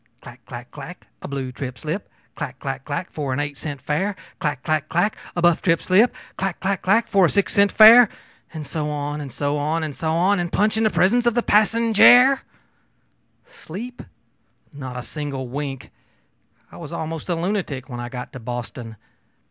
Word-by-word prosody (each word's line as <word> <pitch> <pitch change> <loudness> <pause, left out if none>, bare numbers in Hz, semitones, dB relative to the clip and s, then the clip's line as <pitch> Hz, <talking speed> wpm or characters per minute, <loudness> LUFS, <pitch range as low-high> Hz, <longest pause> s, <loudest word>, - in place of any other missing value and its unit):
'Clack - - -13
clack - - -9
clack, - - -10 0.2
a - - -6
blue 135 -2 -4
trip 125 0 -6
slip, 165 +6 -5 0.2
clack 140 -4 -6
clack 135 -1 -5
clack, 150 +5 -4
for 140 -4 -3
an 130 - -2
eight 145 0 -3
cent 145 0 -6
fare; 155 +9 -1 0.2
clack 145 -4 -2
clack 155 -1 -1
clack, 175 +6 +1 0.2
a 175 - -2
buff 175 -2 +4
trip 165 -2 +2
slip, 205 +7 +3 0.2
clack 195 +1 -2
clack 195 0 -1
clack, 215 +5 +2
for 195 -3 +4
a - - -2
six 200 -1 0
cent 200 0 +4
fare, 225 +1 +9 0.4
and 155 -2 -7
so 150 +2 -3
on, 145 0 -3
and 140 -2 -7
so 145 +3 -2
on, 155 +3 -1
and 150 -3 -4
so 160 -1 -2
on 175 0 +2
punch 210 +4 +1
in 220 - 0
the 215 - +4
presence 240 +6 +2
of 235 - +2
the 240 - +1
passenjare!' 230 +5 +5 1.1
Sleep? 245 - -9 0.7
Not 130 -3 -7
a 125 - -5
single 140 -4 -5
wink! 135 +1 -6 0.8
I - - -12
was 165 -3 -9
almost 165 0 -5
a 175 - +1
lunatic 170 -7 -3
when 120 -3 -7
I 120 0 -5
got 125 -1 -7
to 135 - -7
Boston. 120 -1 -6
160 Hz, 190 wpm, -22 LUFS, 140-200 Hz, 1.1 s, fare